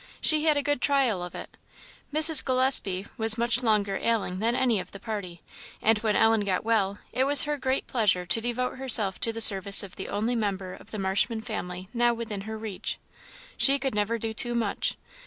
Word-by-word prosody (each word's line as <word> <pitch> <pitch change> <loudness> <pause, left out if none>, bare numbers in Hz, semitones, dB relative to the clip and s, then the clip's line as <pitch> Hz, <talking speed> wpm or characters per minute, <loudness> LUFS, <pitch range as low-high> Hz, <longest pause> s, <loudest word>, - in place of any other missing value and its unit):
She 310 0 +3
had 295 -2 +1
good 290 -3 -1
trial 265 -9 +1
of 175 0 -8
it; - - -10 0.6
Mrs. 310 0 +5
Gillespie 255 -8 +1
was 220 0 +5
much 235 +1 +2
longer 210 -4 0
ailing 215 -5 -2
than 230 +3 0
any 250 -5 0
of - - -10
the 200 - -10
party; 200 -7 -7 0.4
and 220 0 +1
when 215 -1 -1
Ellen 225 -1 +2
got 190 -2 -2
well, 205 -3 -1 0.2
it 260 - 0
was 285 -1 +6
her 295 0 -2
great 265 -1 -3
pleasure 195 -7 0
to 225 +5 -1
devote 250 +2 -3
herself 220 -7 +4
to 230 - 0
the 225 0 -5
service 200 -2 +6
of 190 -2 -12
the 190 - -7
only 225 +4 -2
member 195 -4 -4
of - - -15
the 220 - -7
Marshman 200 +4 -1
family 185 -5 -7
now 240 0 +1
within 225 -4 -6
her 220 - -6
reach. 215 -4 -4 0.6
She 275 0 +5
could 270 -1 -3
never 210 +2 -1
do 225 0 -4
too 240 +2 -2
much. 225 -4 -2
225 Hz, 200 wpm, -25 LUFS, 200-250 Hz, 0.6 s, was